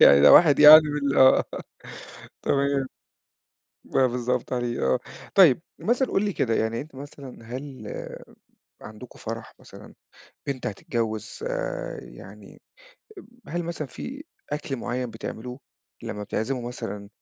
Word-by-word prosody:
يعني 70 Hz, 0 st, +8 dB
ده 75 Hz, -, +8 dB
واحد 155 Hz, -5 st, +7 dB
يعني 150 Hz, +1 st, +11 dB
من 145 Hz, -2 st, -1 dB
ال -, -, -2 dB
آه 130 Hz, 0 st, +6 dB, 1.0 s
تمام. 140 Hz, -1 st, 0 dB, 1.1 s
آه 130 Hz, -, +5 dB
بالضبط 125 Hz, 0 st, -2 dB
عليه 120 Hz, -1 st, -2 dB
آه. -, -, 0 dB, 0.4 s
طيب 170 Hz, -8 st, +6 dB, 0.2 s
مثلًا 250 Hz, +3 st, +1 dB
قُل 195 Hz, -, +1 dB
لي 205 Hz, -, -1 dB
كده 115 Hz, -9 st, 0 dB
يعني 110 Hz, +1 st, -1 dB
أنت 150 Hz, 0 st, -11 dB
مثلًا 140 Hz, -1 st, -10 dB
هل 130 Hz, -1 st, -8 dB, 0.9 s
عندكم 110 Hz, +3 st, -12 dB
فرَح 115 Hz, 0 st, -7 dB
مثلًا، -, -, -14 dB, 0.5 s
بنت 135 Hz, -2 st, -4 dB
هتتجوّز 110 Hz, +1 st, -4 dB
آآ، -, -, -4 dB
يعني -, -, -14 dB, 0.9 s
هل 175 Hz, +2 st, -2 dB
مثلًا 165 Hz, -3 st, -4 dB
في 275 Hz, -, -8 dB, 0.3 s
أكْل 150 Hz, -2 st, -3 dB
معيّن 125 Hz, 0 st, -3 dB
بتعملوه 125 Hz, +3 st, -7 dB, 0.4 s
لمّا 105 Hz, -, -5 dB
بتعزِموا 120 Hz, +4 st, -3 dB
مثلًا 100 Hz, -4 st, -7 dB
130 Hz, 130 wpm, -25 LUFS, 115-150 Hz, 1.1 s, يعني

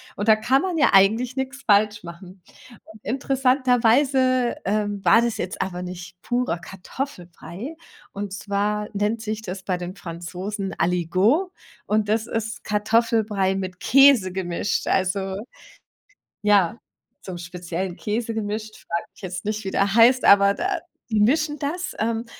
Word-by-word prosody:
Und 205 Hz, +2 st, -4 dB
da 215 Hz, -, +8 dB
kann 260 Hz, +7 st, +1 dB
man 355 Hz, -4 st, -1 dB
ja -, -, +5 dB
eigentlich 225 Hz, +6 st, +4 dB
nix 265 Hz, +1 st, -4 dB
falsch 210 Hz, -2 st, +3 dB
machen. 180 Hz, +2 st, -11 dB, 0.6 s
Interessanterweise, 255 Hz, 0 st, +2 dB
äh, 210 Hz, +1 st, 0 dB
war 200 Hz, +2 st, +3 dB
das 235 Hz, -1 st, -1 dB
jetzt 185 Hz, -, -4 dB
aber 180 Hz, -1 st, -3 dB
nicht 180 Hz, 0 st, -9 dB
purer 245 Hz, -8 st, -1 dB
Kartoffelbrei. 190 Hz, -, -7 dB, 0.4 s
Und 200 Hz, -1 st, -5 dB
zwar 210 Hz, +1 st, -2 dB
nennt 210 Hz, +3 st, -1 dB
sich 220 Hz, 0 st, -4 dB
das 190 Hz, 0 st, -6 dB
bei 185 Hz, -1 st, -2 dB
den 180 Hz, +2 st, -6 dB
Franzosen 185 Hz, +3 st, -6 dB
Aligot 185 Hz, -, +1 dB, 0.3 s
und 210 Hz, -1 st, 0 dB
das 220 Hz, +1 st, +1 dB
ist 225 Hz, 0 st, -4 dB
Kartoffelbrei 210 Hz, -2 st, +1 dB
mit 185 Hz, -1 st, -5 dB
Käse 270 Hz, -8 st, +5 dB
gemischt. 185 Hz, +1 st, -2 dB
Also, 190 Hz, 0 st, 0 dB, 1.1 s
ja, 205 Hz, 0 st, +3 dB, 0.5 s
so'm 180 Hz, -2 st, -6 dB
speziellen 175 Hz, +1 st, -5 dB
Käse 225 Hz, +2 st, -2 dB
gemischt, 215 Hz, 0 st, -4 dB
frage 170 Hz, -, -2 dB
mich -, -, -19 dB
jetzt 185 Hz, -1 st, -5 dB
nicht, 215 Hz, -1 st, -3 dB
wie 190 Hz, -, -3 dB
der 195 Hz, +1 st, +1 dB
heißt, 240 Hz, +2 st, +6 dB
aber 200 Hz, 0 st, +6 dB
de 350 Hz, -, -4 dB, 0.4 s
die 215 Hz, -2 st, +1 dB
mischen 295 Hz, +7 st, +2 dB
das, 350 Hz, +6 st, -3 dB
ähm, 230 Hz, +1 st, -1 dB
210 Hz, 140 wpm, -23 LUFS, 190-235 Hz, 1.1 s, da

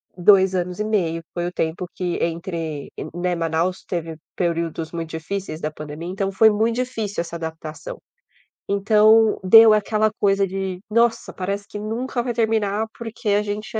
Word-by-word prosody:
2 190 Hz, +1 st, +5 dB
anos 180 Hz, 0 st, -2 dB
e -, -, +1 dB
meio 180 Hz, -7 st, 0 dB
foi 175 Hz, -1 st, -2 dB
o -, -, -4 dB
tempo 165 Hz, +1 st, -2 dB
que 180 Hz, -2 st, -2 dB
entre, 165 Hz, -3 st, -4 dB, 0.2 s
né. 175 Hz, +1 st, -1 dB
Manaus 165 Hz, +2 st, -1 dB
teve 165 Hz, -3 st, -4 dB, 0.2 s
períodos 165 Hz, -2 st, -2 dB
muito 165 Hz, -1 st, -5 dB
difíceis 160 Hz, 0 st, -5 dB
da 155 Hz, -, -2 dB
pandemia, 150 Hz, +2 st, -8 dB
então 195 Hz, +1 st, -2 dB
foi 220 Hz, +3 st, +6 dB
muito 220 Hz, +2 st, +1 dB
difícil 225 Hz, -6 st, -2 dB
essa 170 Hz, 0 st, -7 dB
adaptação. 160 Hz, -2 st, -7 dB, 0.7 s
Então 215 Hz, +2 st, +4 dB
deu 220 Hz, +4 st, +8 dB
aquela 215 Hz, +1 st, +2 dB
coisa 195 Hz, -1 st, +3 dB
de: 190 Hz, -1 st, -4 dB
"Nossa, 230 Hz, +1 st, +2 dB
parece 200 Hz, +2 st, -4 dB
que 210 Hz, -, -7 dB
nunca 235 Hz, +4 st, -3 dB
vai 240 Hz, 0 st, -2 dB
terminar.", 220 Hz, -2 st, +1 dB
porque 225 Hz, -1 st, -4 dB
a 205 Hz, +1 st, +3 dB
gente 210 Hz, +1 st, -4 dB
190 Hz, 160 wpm, -22 LUFS, 170-215 Hz, 0.7 s, deu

